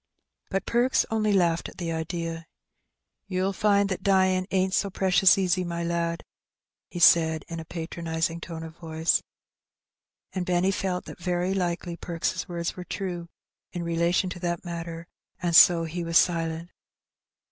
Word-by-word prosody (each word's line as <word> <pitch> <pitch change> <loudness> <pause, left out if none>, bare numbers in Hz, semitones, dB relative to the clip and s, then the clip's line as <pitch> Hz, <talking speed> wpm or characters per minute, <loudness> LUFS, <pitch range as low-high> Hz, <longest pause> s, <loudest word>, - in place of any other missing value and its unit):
But 195 - -2
Perks 245 +2 +2
only 215 -1 +1
laughed 170 -4 +2
at - - -16
the 170 -2 -3
idea. 165 +1 -3
'^ 165 0 -9 0.8
You'll 190 0 -1
find 200 0 +3
that 190 - -3
dyin* 185 -1 +2
ain't 190 0 +1
so 200 - +1
precious 190 -1 +4
easy, 185 -1 +1
my 170 -1 -3
lad,'' 170 0 -2 0.7
he - - -8
said, 160 -2 +5
in 165 -1 -6
a 160 - -7
patronizing 165 0 -3
tone 165 -1 -7
of 160 0 -9
voice. 160 -1 0 1.1
And 185 - -2
Benny 180 +1 +1
felt 185 -1 -2
that - - -10
very 180 +1 -1
likely 175 -2 -2
Perks' 170 0 -3
words 170 -1 -3
were 180 - -7
true 175 -2 -5 0.4
in 175 -2 -3
relation 170 +2 +1
to 180 - -7
that 175 0 -3
matter, 170 -1 -6 0.3
and 175 -2 0
so 170 -1 +8
he 170 +2 -4
was 165 0 +2
silent. 165 -1 +1
175 Hz, 160 wpm, -26 LUFS, 165-185 Hz, 1.1 s, so